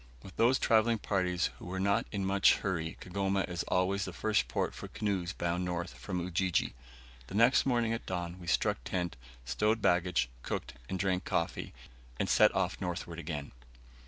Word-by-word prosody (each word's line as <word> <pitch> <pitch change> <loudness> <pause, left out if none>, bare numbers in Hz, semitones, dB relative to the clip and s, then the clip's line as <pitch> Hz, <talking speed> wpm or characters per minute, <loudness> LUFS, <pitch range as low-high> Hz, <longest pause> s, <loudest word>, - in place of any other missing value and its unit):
With 95 - -11
those 125 +3 +4
travelling 115 -1 +3
parties 90 -4 0
who 90 - -8
are 95 - -2
not 100 +1 +2
in 100 -2 -2
much 95 +1 +5
hurry 85 -5 -2
Kigoma 95 +1 0
is 90 -2 -3
always 95 +2 +1
the 95 - -5
first 105 +3 +1
port - - -1
for - - -7
canoes 95 -5 -2
bound 85 -1 -1
north 90 0 -3
from 90 -3 -4
Ujiji. 90 +1 0 0.5
The - - -7
next 120 +5 +5
morning 120 -3 +2
at 115 - -5
dawn 90 -1 -3
we 85 - -10
struck - - +1
tent, 90 -4 -2 0.3
stowed 105 - +1
baggage, 90 - +2
cooked, - - -4 0.2
and 95 - -1
drank 95 -1 0
coffee, 85 - -2 0.5
and - - +1
set - - +6
off - - 0
northward 85 -2 -4
again. 75 -3 -5
95 Hz, 175 wpm, -32 LUFS, 90-100 Hz, 0.5 s, set